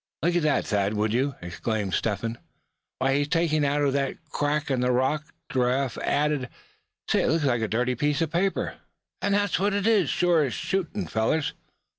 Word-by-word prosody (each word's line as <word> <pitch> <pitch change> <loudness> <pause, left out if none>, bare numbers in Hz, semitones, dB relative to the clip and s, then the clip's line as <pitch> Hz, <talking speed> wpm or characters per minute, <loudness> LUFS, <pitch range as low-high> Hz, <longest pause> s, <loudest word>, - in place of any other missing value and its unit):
"Look 175 +1 +2
at 155 -2 +2
Thad, 100 0 0
would 105 +1 0
you?" 135 +2 +1
exclaimed 100 +3 -3
Step 105 -3 0
Hen. 115 0 -4 0.6
"What's 135 +1 +1
he 145 +1 +2
taking 155 -1 +1
out 145 +1 +1
of 140 -2 +2
that 140 -1 0 0.2
crack 145 0 0
in 130 - +1
the 125 0 +2
rock?" 135 +5 +1 0.3
Giraffe 130 0 +1
added. 145 -3 0 0.6
"Say, - - +2
looks 160 -2 +2
like 120 -4 +2
a 110 - 0
dirty 125 +4 0
piece 145 +3 0
of 165 -2 0
paper; 190 +4 0 0.4
and 200 0 +2
that's 205 -5 +1
what 200 +1 +1
it 200 0 0
is, 210 -8 +3
sure 175 -3 +3
as 130 - -2
shootin', 195 +1 -2
fellers!" 115 +8 0
140 Hz, 185 wpm, -26 LUFS, 125-165 Hz, 0.6 s, is